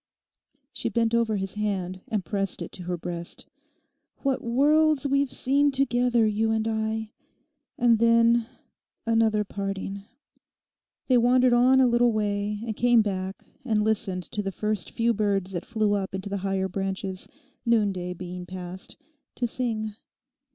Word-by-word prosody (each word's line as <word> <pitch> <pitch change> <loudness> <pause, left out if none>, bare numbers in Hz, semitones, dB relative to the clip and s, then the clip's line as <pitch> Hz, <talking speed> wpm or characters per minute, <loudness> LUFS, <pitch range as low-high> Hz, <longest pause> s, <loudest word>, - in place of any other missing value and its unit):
She - - -2
bent 230 +1 +1
over 230 -2 +2
his 195 -1 -3
hand 190 -3 -2
and 210 -4 -2
pressed 195 -3 -2
it - - -9
to 180 - -9
her 175 0 -2
breast. 170 0 -6 0.8
'What 270 -2 0
worlds 295 +4 +3
we've 275 -1 +1
seen 285 +2 +2
together, 245 -4 +2
you 215 +1 +1
and 220 0 0
I. 220 0 -2 0.7
And 235 -2 +4
then—another 230 -1 +1
parting.' 195 0 -4 1.0
They 255 -2 +4
wandered 250 +1 +4
on 255 +2 +5
a 260 - +6
little 240 0 +3
way, 205 0 -1
and 220 -2 -3
came 240 -1 +4
back 190 -1 -4 0.2
and 220 -4 +1
listened 200 -4 0
to 210 - -2
the 195 -1 -3
first 210 -3 -2
few 235 0 +1
birds 200 -3 0
that 175 -2 -5
flew 215 -3 +1
up 195 -1 -2
into 190 +1 -5
the 200 - -2
higher 195 0 -1
branches, 190 0 -3 0.4
noonday 200 -6 +1
being 180 0 -7
past, 185 0 -8 0.4
to 245 - -1
sing. 220 -3 -2
215 Hz, 145 wpm, -26 LUFS, 195-235 Hz, 1.0 s, a